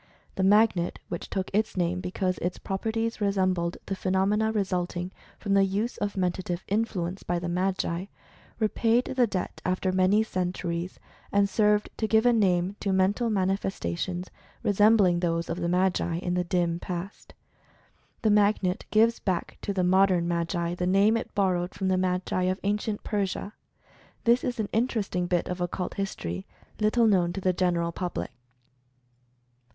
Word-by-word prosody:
The - - -3
Magnet, 195 -2 +3
which 170 - -5
took 190 -1 -3
its 215 -1 0
name 180 0 0
because 185 -1 -2
its 180 +1 -2
properties 225 +3 -2
resembled 185 -4 +1
the 195 - -3
phenomena 195 +4 +1
resulting 180 -3 -2 0.3
from 200 -2 -2
the 195 0 +5
use 200 +5 -1
of 205 -1 -2
Mentative 180 -1 -1
Influence 195 -4 -1
by 175 - -1
the 175 0 -3
Magi, 180 0 -1 0.5
repaid 230 +2 +2
the 250 -2 +4
debt 190 -3 -4
after 185 +1 0
many 190 +3 +3
centuries, 180 -3 -3 0.3
and 200 0 +3
served 210 +1 +2
to 220 - 0
give 220 +1 +3
a 245 - +5
name 190 -3 +2
to 200 - -1
mental 195 +5 +2
manifestations 185 - -2 0.3
resembling 205 -3 +4
those 170 -1 -1
of 175 - -3
the 170 -1 -1
Magi 180 -2 +1
in 175 0 -2
the 180 0 +1
dim 170 -1 0
past. 180 +2 -7 0.9
The 215 - +4
Magnet 205 -3 +2
gives 225 +2 +3
back 185 -4 -2
to - - -2
the 190 -2 0
modern 185 -1 +3
Magi 170 0 -1
the 180 0 -2
name 200 +4 +4
it 230 - -3
borrowed 185 -3 0
from 190 -1 -1
the 185 - +2
Magi 185 0 0
of 185 +1 0
Ancient 210 +1 -1
Persia. 200 0 -2 0.7
This 235 +2 +4
is 245 -2 -2
an 215 - 0
interesting 215 -6 0
bit 175 -1 0
of 180 0 -4
Occult 175 +1 -3
History 95 - -4 0.3
little 220 +2 +3
known 185 -5 +3
to 195 - -4
the 185 0 +2
general 175 -2 0
public. 175 -5 -4
190 Hz, 155 wpm, -27 LUFS, 180-205 Hz, 0.9 s, the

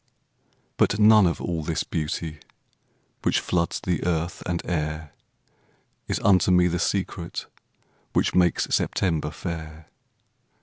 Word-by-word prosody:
But 100 - +3
none 105 -2 +7
of 85 - -1
all 85 -2 -2
this 80 +1 -2
beauty 75 0 -3 0.8
Which - - +2
floods 85 -2 -1
the 90 -4 -2
earth 85 0 -1
and 85 -1 -1
air 75 -2 -3 0.9
Is - - -1
unto 95 -2 +4
me 90 -1 +5
the 90 0 -1
secret 90 -3 -2 0.7
Which - - +2
makes 90 -2 +3
September 80 -5 0
fair. 80 0 -7
85 Hz, 120 wpm, -25 LUFS, 80-90 Hz, 0.9 s, none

